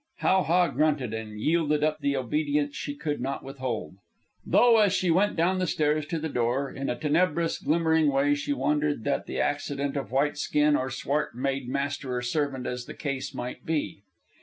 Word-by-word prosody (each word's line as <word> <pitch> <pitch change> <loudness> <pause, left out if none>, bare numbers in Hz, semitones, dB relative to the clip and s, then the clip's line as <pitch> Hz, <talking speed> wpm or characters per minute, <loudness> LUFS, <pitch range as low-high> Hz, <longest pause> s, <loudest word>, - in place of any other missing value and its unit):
How 190 0 +3
ha 175 +1 +3
grunted, 145 -5 0
and 110 -1 -6
yielded 150 +2 +1
up 155 0 +1
the 140 -1 0
obedience 145 +2 0
she 145 - -4
could 150 -1 -3
not 135 +2 -3
withhold; 130 -8 -5 0.5
though, 240 -2 +5
as 205 -3 +4
she 185 -3 +2
went 195 +5 +2
down 180 +3 +2
the 185 - 0
stairs 150 -1 +1
to 165 - -2
the 160 0 -3
door, 130 0 -1
in 135 0 -4
a - - 0
tenebrous, 165 +2 +1
glimmering 160 -2 +2
way 140 +1 +3
she 145 0 -2
wondered 145 -1 0
that - - -1
the 65 - -4
accident 140 - -1
of 135 -4 -4
white 145 +3 +1
skin 150 0 +2
or 130 -1 -1
swart 140 +1 -2
made 135 0 -2
master 140 -1 -2
or 125 - -3
servant 135 -1 -1
as 125 0 -4
the - - -8
case 140 -2 -4
might 125 - -5
be. 155 -10 -2
145 Hz, 190 wpm, -27 LUFS, 135-155 Hz, 0.5 s, though